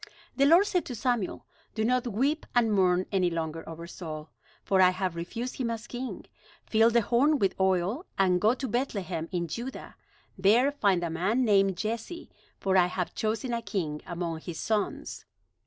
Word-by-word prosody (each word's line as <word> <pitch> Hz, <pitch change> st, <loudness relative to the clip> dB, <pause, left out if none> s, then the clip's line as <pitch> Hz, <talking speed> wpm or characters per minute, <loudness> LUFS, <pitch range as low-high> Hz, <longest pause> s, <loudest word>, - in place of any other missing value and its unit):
The 275 Hz, +1 st, +4 dB
Lord 340 Hz, +6 st, +6 dB
said 360 Hz, -3 st, 0 dB
to 250 Hz, -, -5 dB
Samuel: 235 Hz, -4 st, -1 dB, 0.3 s
"Do 220 Hz, -1 st, 0 dB
not 250 Hz, +1 st, +1 dB
weep 270 Hz, +8 st, 0 dB
and 230 Hz, -3 st, +3 dB
mourn 185 Hz, -2 st, +3 dB
any 185 Hz, -3 st, +2 dB
longer 165 Hz, -1 st, -3 dB
over 165 Hz, +1 st, -7 dB
Saul, 155 Hz, -3 st, -8 dB, 0.3 s
for 190 Hz, -1 st, +3 dB
I 185 Hz, -, +7 dB
have 185 Hz, -1 st, -2 dB
refused 230 Hz, +9 st, -5 dB
him 250 Hz, -3 st, -1 dB
as 230 Hz, 0 st, -4 dB
king. 255 Hz, +1 st, -6 dB, 0.4 s
Fill 225 Hz, +1 st, +4 dB
the 235 Hz, -1 st, +3 dB
horn 275 Hz, +8 st, +3 dB
with 195 Hz, -7 st, +1 dB
oil, 190 Hz, -, +1 dB
and 180 Hz, -2 st, +3 dB
go 220 Hz, +4 st, +4 dB
to 265 Hz, -, -4 dB
Bethlehem 195 Hz, -9 st, -2 dB
in 175 Hz, -2 st, -1 dB
Judah. 240 Hz, +10 st, -6 dB, 0.4 s
There 230 Hz, +9 st, +4 dB
find 200 Hz, -11 st, +1 dB
a 170 Hz, -, -2 dB
man 200 Hz, +10 st, +1 dB
named 195 Hz, -3 st, +3 dB
Jesse, 225 Hz, -, -4 dB, 0.3 s
for 190 Hz, -1 st, +2 dB
I 180 Hz, -1 st, +5 dB
have 180 Hz, -1 st, -3 dB
chosen 225 Hz, +3 st, -2 dB
a 235 Hz, -, -1 dB
king 160 Hz, -9 st, -3 dB
among 170 Hz, -2 st, -3 dB
his 160 Hz, 0 st, -7 dB
sons." 215 Hz, -2 st, -2 dB
205 Hz, 180 wpm, -28 LUFS, 180-240 Hz, 0.4 s, I